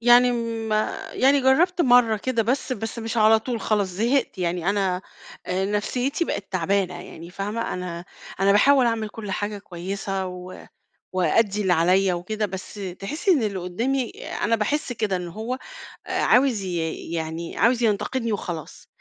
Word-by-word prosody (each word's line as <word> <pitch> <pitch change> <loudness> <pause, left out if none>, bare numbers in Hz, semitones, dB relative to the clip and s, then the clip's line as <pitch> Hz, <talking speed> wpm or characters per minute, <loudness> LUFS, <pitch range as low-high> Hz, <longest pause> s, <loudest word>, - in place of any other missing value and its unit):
يعني 245 +1 +6 0.4
ما 215 0 -1
يعني 275 +2 +4
جَرَّبت 330 +7 +3
مرة 245 -5 +5
كده 230 +1 0
بس، 255 +3 -1
بس 225 0 -4
مش 225 +1 -4
على 220 0 +6
طول 230 0 -4
خلاص 205 -3 +1
زهقت 225 +4 0
يعني، 175 +1 0
أنا 190 -2 0 0.4
آآ 185 +1 0
نفسيِّتي 250 +9 -1
بقت 195 -9 -4
تعبانة 185 +1 +1
يعني، 170 +2 -10
فاهمة؟ 210 +5 -3
أنا 175 -1 -5 0.4
أنا 195 +1 +5
باحاول 265 +4 +5
أعمل 225 -2 0
كُلّ 210 -2 -7
حاجة 205 +2 -2
كويِّسة 195 +1 -4
و 180 0 -9 0.5
وأأدّي 195 +4 +2
اللي 190 -3 +3
عليَّ 185 +3 +3
وكده، 210 +5 -2
بس 190 -1 -7 0.3
تحِسِّي 310 - 0
إن 285 -9 +3
اللي 200 -3 -1
قُدَّامي 235 +8 -1 0.2
أنا 230 +2 0
باحِسّ 250 +5 -1
كده، 215 -4 -1
إن 180 -1 -4
هو 220 +8 -4 0.5
آآ - - -1
عاوز 250 -4 +4
ي 170 -3 -2 0.2
يعني 165 +1 -4
عاوز 240 +1 +3
ينتقدني 230 +2 0
وخلاص، 175 -6 -6
210 Hz, 160 wpm, -24 LUFS, 185-240 Hz, 0.5 s, يعني